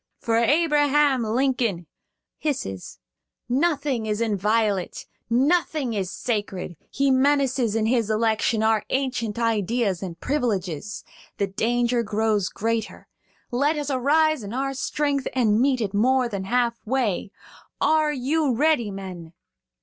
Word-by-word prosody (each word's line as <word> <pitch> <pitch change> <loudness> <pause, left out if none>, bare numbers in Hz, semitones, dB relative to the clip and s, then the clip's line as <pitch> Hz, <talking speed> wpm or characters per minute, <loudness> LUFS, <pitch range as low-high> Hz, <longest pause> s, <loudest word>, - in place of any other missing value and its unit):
For 230 -1 0
Abraham 290 0 +3
Lincoln 230 -5 0 0.5
(hisses) 95 - -4 0.5
nothing 275 -3 0
is 210 0 -1
inviolate, 210 -2 0 0.2
nothing 265 - +1
sacred; 195 -2 -4
he 275 0 +1
menaces, 260 -4 +2
in 220 -1 +1
his 230 -2 +1
election, 220 0 +1
our 220 -1 +2
ancient 255 -5 -1
ideas 225 -3 0
and 175 -3 -6
privileges. 210 - -2 0.3
The 200 - +1
danger 235 +4 0
grows 215 -2 0
greater. 225 0 -3 0.4
Let 285 +5 +1
us 290 -1 -3
arise 300 +3 +2
in 205 +3 -6
our 270 +1 -1
strength 280 0 -1
and 225 -3 +3
meet 260 -2 +2
it 205 -2 -2
more 250 +4 +3
than 200 -4 -5
half 235 +2 0
way. 225 -6 -1 0.5
Are 310 -1 +3
you 285 0 0
ready, 290 -5 +2
men?" 185 -4 -8
235 Hz, 120 wpm, -24 LUFS, 210-275 Hz, 0.5 s, Abraham